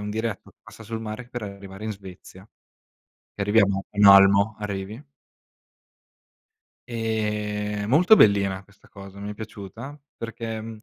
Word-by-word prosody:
un 105 - -4
diretto 110 -1 -4
che - - -30
passa 110 - -14
sul 110 +1 -6
mare 110 +2 -7
per 120 -3 -6
arrivare 100 0 -9
in 110 - -3
Svezia. 95 0 -13 0.9
Arriviamo 100 -1 +2
a 100 - -17
Malmo, 100 +1 +7
arrivi 105 +3 -5 1.9
ehm, 105 -2 -2
molto 180 - +6
bellina 100 -2 +3
questa 100 0 -24
cosa, 100 0 -12
mi 105 +1 -5
è - - -6
piaciuta, 110 +7 -9 0.2
perché 115 -1 -7
105 Hz, 130 wpm, -24 LUFS, 100-110 Hz, 1.9 s, Malmo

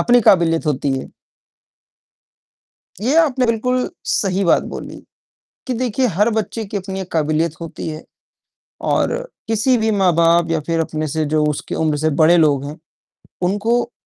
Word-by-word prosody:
अपनी 245 0 +4
काबिलियत 165 -3 +3
होती 140 -1 0
है। - - -7 2.0
ये 265 +7 +1
आपने 270 -6 +2
बिल्कुल 250 +2 0 0.2
सही 195 -1 0
बात 170 - +3
बोली, - - -7 0.7
कि 255 - -1
देखिए, 250 +1 0
हर 210 +2 +1
बच्चे 220 0 -2
की 205 0 -6
अपनी 190 0 -4
एक 185 - -7
काबिलियत 155 0 0
होती 165 -1 -6
है 155 0 -7 0.9
और - - +1 0.3
किसी 225 +3 +2
भी 220 -1 +1
माँ-बाप 170 -4 +3
या 160 - +1
फिर 165 0 0
अपने 155 -1 -2
से, 155 +1 -1
जो 155 +1 +1
उसकी 150 -1 -3
उम्र 155 -2 0
से 155 +2 +1
बड़े 170 +3 +6
लोग 145 -4 +3
हो, 145 +2 -7 0.6
उनको 210 +6 0
180 Hz, 155 wpm, -19 LUFS, 155-225 Hz, 2.0 s, बड़े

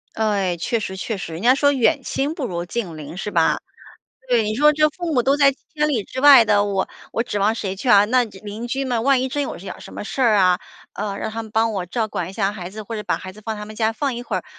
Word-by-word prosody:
对， 200 -5 0
确 230 +8 -1
实 190 -3 -5
确 220 +3 -3
实， 190 -4 -6
人 160 +2 -6
家 250 +4 +5
说 285 +1 +3
远 280 +3 +2
亲 280 +5 -2
不 275 - -3
如 175 -4 -4
近 175 -4 -4
邻， 150 +2 -8
是 200 +3 -4
吧？ 165 -3 +2 0.7
对， 240 -2 +3
你 215 - -1
说 300 +5 +5
这 305 0 +3
父 340 +1 -4
母 250 - +3
都 275 +3 +3
在 280 -1 +5
千 300 +2 -3
里 240 -9 0
之 260 - -6
外 275 -5 +9
的， 205 -1 +3
我 195 -2 -1 0.2
我 230 - 0
指 205 -4 -3
望 205 +2 +3
谁 195 -4 -3
去 225 +7 -5
啊？ 205 -3 +7
那 245 +3 +3
这 200 -4 -12
邻 215 +4 -6
居 270 +2 -1
们 240 -3 -1
万 270 0 +3
一 260 - -1
真 290 +3 -1
有 275 - -4
一 - - -12
点 195 - -7
儿 - - -15
什 - - -11
么 - - -6
事 265 - -5
儿 220 -4 +4
啊， 185 -1 +4 0.3
呃， 200 -1 -4
让 - - -3
他 225 - -4
们 220 - -11
帮 225 +1 +1
我 185 -3 -3
照 220 +5 -1
管 180 -4 -4
一 - - -11
下 195 -1 0
孩 185 -3 -7
子， 215 +1 -8
或 230 - -6
者 210 - -4
把 - - -1
孩 185 0 -8
子 215 - -14
放 220 -1 -3
他 210 - -6
们 215 +1 -10
家 220 0 +1
放 275 +2 -2
一 240 - -5
会 - - -3
儿， - - -4
220 Hz, 320 characters per minute, -21 LUFS, 195-260 Hz, 0.7 s, 外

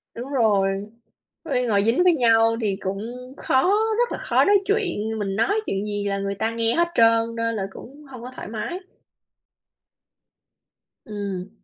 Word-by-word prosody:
Đúng 245 +3 -7
rồi, 200 -5 +2 0.6
ôi 270 -7 -1
ngồi 200 -2 +3
dính 235 +10 +3
với 360 -2 +5
nhau 230 -4 +3
thì 205 -4 0
cũng 190 +1 -3 0.4
khó, 260 0 +1 0.4
rất 485 0 +1
là - - -4
khó - - +2
nói 405 0 +5
chuyện, 290 - -1
mình 195 -2 -2
nói 405 - +1
chuyện 195 +1 -2
gì 205 -1 -3
là 200 0 -1
người 200 0 -2
ta 220 +3 -1
nghe 230 0 +1
hết 340 0 +2
trơn, 230 0 +3
nên 230 0 -1
là 205 - -2
cũng 280 +9 -13
hông 250 -3 -10
có 250 - -7
thoải - - -7
mái. 230 - -4 2.3
Ừm. 200 -3 -5
225 Hz, 170 wpm, -23 LUFS, 200-260 Hz, 2.3 s, với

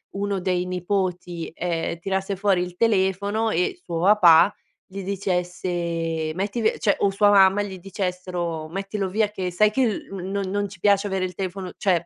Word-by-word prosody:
uno 200 -1 -2
dei 180 -1 0
nipoti, 180 -2 -2
ehm, 170 -1 -2
tirasse 190 +2 -2
fuori 195 -2 +2
il 180 0 -5
telefono 205 +1 +1
e 175 0 0
suo 170 -2 -4
papà 185 -2 +6 0.3
gli 195 +1 -7
dicesse: 175 -4 -2
"Metti 200 +5 -2
vi", 220 -1 +2
cioè, 200 - +1
o 200 - +3
sua 205 +1 +3
mamma 195 0 +5
gli 190 -2 -7
dicessero: 180 -4 -4
"Mettilo 195 +3 -3
via 210 +3 +1
che 185 -3 -3
sai 210 +4 +3
che 255 +2 +2
l 215 - -4
non 195 +1 -3
non 205 +1 -1
ci 185 - -13
piace 200 0 +3
avere 190 -1 -1
il 180 -1 -4
telefono". 185 -1 -4
Cioè 175 -4 +1
190 Hz, 175 wpm, -23 LUFS, 180-200 Hz, 0.3 s, papà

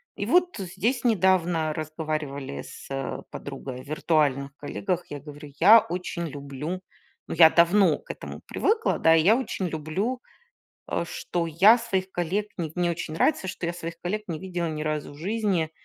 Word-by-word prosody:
И - - -3
вот 360 -3 +3
здесь 195 +7 -1
недавно 180 -7 +2
разговаривали 155 - -4
с, - - -11
э, 135 0 -3
подругой 135 -2 -7
о - - -13
виртуальных 145 -2 0
коллегах. 180 +4 -3
Я 145 - -6
говорю: 145 0 -11
"Я 215 +7 +9
очень 180 -4 -4
люблю", 145 +5 -5 0.5
ну, - - -4
я 160 -2 +9
давно 170 0 +4
к - - -8
этому - - -9
привыкла, 445 +1 +1
да. 165 0 +6
И 160 - +5
я 215 +6 +6
очень 245 -7 -2
люблю, 185 - -2 0.7
э, - - 0
что 170 0 -3
я 195 +9 +6
своих 190 -5 -2
коллег 185 +5 -1
не 165 -3 -2
в - - -27
мне 175 -1 +2
очень 160 -1 -5
нравится, 190 - +1
что 180 - -4
я 170 - -2
своих 170 0 -7
коллег 210 +4 -2
не 160 -3 -4
видела 175 -2 -3
ни 155 -1 -4
разу 155 -1 -3
в - - -14
жизни. 190 -3 0
170 Hz, 180 wpm, -26 LUFS, 155-190 Hz, 0.7 s, Я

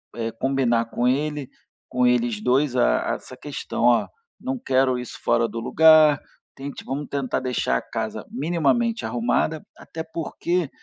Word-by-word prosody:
eh, 115 -1 -3
combinar 120 -2 +1
com 120 +2 -1
ele 145 +1 -1 0.4
com 125 0 +1
eles 120 -3 +2
2 130 +3 +2
a - - +2
a - - 0
essa - - -11
questão. - - -5
"Ó, 120 -1 +4 0.3
não 260 +1 -3
quero 130 - +2
isso 125 0 -7
fora 120 0 +2
do 115 +1 -6
lugar, 155 +2 +6 0.4
tente 140 +1 -7
vamos 140 +2 -4
tentar 135 -3 -2
deixar 125 - 0
a - - -3
casa - - -5
minimamente 175 - 0
arrumada", 120 +7 0 0.2
até 160 0 -7
porque 165 0 -2
130 Hz, 155 wpm, -23 LUFS, 120-155 Hz, 0.4 s, lugar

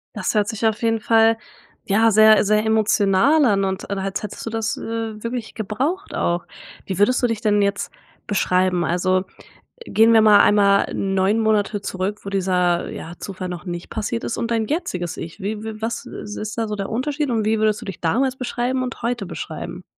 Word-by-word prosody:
Das - - -1
hört 210 -2 +2
sich 220 0 -3
auf 220 -1 +1
jeden 225 -1 +1
Fall, 225 0 +4 0.5
ja, 220 +3 +4
sehr 215 0 +6
sehr 215 +1 +2
emotional 220 +6 +3
an 200 -4 +2
und 190 0 -4
als 195 0 -3
hättest 210 - -7
du - - -3
das, 225 0 -2
äh, 225 -1 -4
wirklich 230 0 -5
gebraucht 270 - -3
auch. 175 0 -1 0.4
Wie 190 - -4
würdest 250 +5 +3
du 245 - +3
dich 225 -2 -3
denn 210 -2 +2
jetzt 200 0 -1 0.3
beschreiben? 185 -3 +1
Also, 185 +2 +1 0.6
gehen 225 +1 +4
wir 225 -1 +6
mal 210 -1 +7
einmal 200 -1 +4
9 195 +2 +1
Monate 215 -2 +1
zurück, 195 +1 -3
wo 200 - -5
dieser, 180 -3 +1
ja, 165 - -7
Zufall 185 -2 -6
noch 180 0 -7
nicht 175 -1 -6
passiert 230 +2 -3
ist - - -3
und 235 0 -2
dein 225 -1 0
jetziges 185 - -3
ich. 165 +4 -8
Wie 210 +2 -4
wie 220 -1 -7
was, 230 +1 -3
äh, - - -8
ist 215 +1 -6
da 225 -1 -1
so 210 - -3
der 195 -1 -4
Unterschied 285 +5 -2
und 225 -3 0
wie 220 0 +1
würdest 215 -1 +1
du - - -8
dich 195 - -7
damals 255 +10 +1
beschreiben 255 0 -2
und 250 -3 -6
heute 235 -3 -1
beschreiben? - - -7
215 Hz, 200 wpm, -21 LUFS, 195-225 Hz, 0.6 s, mal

